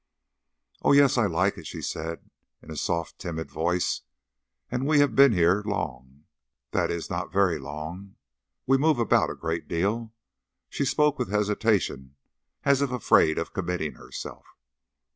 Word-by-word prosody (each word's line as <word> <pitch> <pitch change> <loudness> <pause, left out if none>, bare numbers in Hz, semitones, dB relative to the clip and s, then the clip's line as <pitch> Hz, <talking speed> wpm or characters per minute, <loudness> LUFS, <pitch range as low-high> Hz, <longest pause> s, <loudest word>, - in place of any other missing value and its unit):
"Oh, - - +4
yes, 140 -1 +6
I 120 -4 +3
like 90 +3 0
it," - - -9
she - - -7
said, 80 +1 -5 0.4
in 80 - -11
a - - -6
soft, 85 +3 -2
timid 80 -3 -5
voice; 90 +2 0 0.7
"and 125 +3 -1
we 155 0 +4
have 145 -5 +3
been 140 -1 +7
here 90 +1 +3
long 70 -9 -5 0.5
that - - +1
is, 85 -1 -3
not - - -3
very 95 -3 +2
long. 80 +8 -7 0.5
We 135 +1 +3
move 155 0 +3
about 115 - +3
a - - -5
great 85 0 -3
deal." 105 +7 -1 0.6
She 140 - -2
spoke 150 +1 +2
with - - -2
hesitation, 105 - 0 0.5
as 140 -1 +3
if 140 - +1
afraid 110 -10 +3
of 85 -3 -3
committing 90 -4 -2
herself. - - -9
95 Hz, 155 wpm, -26 LUFS, 80-125 Hz, 0.7 s, been